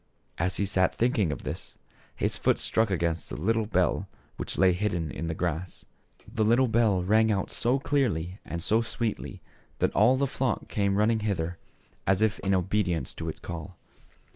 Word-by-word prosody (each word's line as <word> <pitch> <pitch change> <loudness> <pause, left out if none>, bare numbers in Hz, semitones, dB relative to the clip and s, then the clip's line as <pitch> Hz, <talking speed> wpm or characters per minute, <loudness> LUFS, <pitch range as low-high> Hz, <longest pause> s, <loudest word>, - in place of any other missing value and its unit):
As 90 +2 +1
he 100 - +1
sat 95 -1 +2
thinking 110 - +2
of 70 - -5
this - - -6 0.4
his - - 0
foot - - +2
struck 110 -1 +1
against 85 -3 -1
a - - -4
little 110 +7 0
bell 90 -4 +1 0.3
which - - -4
lay 95 -1 +5
hidden 90 -5 -1
in 85 - -4
the 80 - -2
grass. 85 +1 -3 0.4
The 110 0 -1
little 120 +4 +4
bell 110 -5 +2
rang 110 +3 +4
out 95 -2 -1
so 125 +3 +1
clearly 110 - 0
and 85 0 -5
sweetly 115 0 -1 0.3
that - - +1
all 120 +6 +5
the 140 - +2
flock 130 -3 -1
came 100 -1 0
running 110 +2 +3
hither, 90 -5 -2 0.5
as 95 +2 +3
if 110 -1 +1
in 95 0 +1
obedience 90 -6 0
to - - -5
its - - -7
call. 85 +2 -7
100 Hz, 175 wpm, -28 LUFS, 90-110 Hz, 0.5 s, lay